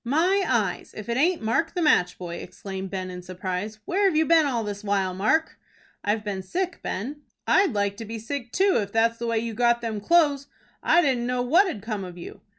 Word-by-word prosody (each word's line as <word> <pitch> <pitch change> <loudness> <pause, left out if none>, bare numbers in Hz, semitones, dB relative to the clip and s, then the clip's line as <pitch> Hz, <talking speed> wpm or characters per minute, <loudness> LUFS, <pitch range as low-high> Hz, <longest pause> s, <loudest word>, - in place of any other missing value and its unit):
"My 340 +10 +2
eyes, - - -1
if 215 +1 -7
it 235 - 0
aint 330 0 +2
Mark, 320 - 0
the 355 - 0
match 180 - +3
boy!" 170 -1 -6
exclaimed 190 0 -7
Ben, 185 -1 -4
in 180 0 -7
surprise. 185 +3 -4
"Where've 385 -1 +2
you 315 +1 +4
been 325 -2 +5
all 240 -4 -1
this 205 0 -5
while, 195 -2 0
Mark?" 215 - +1 0.4
"I've 210 +1 0
been 200 -3 -3
sick, 350 - -3
Ben." 275 +10 -4 0.2
"I'd 385 - +3
like 200 -1 0
to 225 - -6
be 225 +2 -6
sick 245 +2 -5
too, 385 +5 +3
if 200 -2 -2
that's 230 +1 +2
the 235 - -3
way 230 -1 +1
you 230 0 -2
got 235 +1 +2
them 220 -3 -3
clo'es. 290 0 +3 0.3
I 350 - +4
didn't 250 -5 +1
know 250 0 0
what 340 +11 +4
had 215 - -5
'come 215 -3 -3
of 180 -1 -9
you." 170 - -10
230 Hz, 220 wpm, -25 LUFS, 200-300 Hz, 0.4 s, been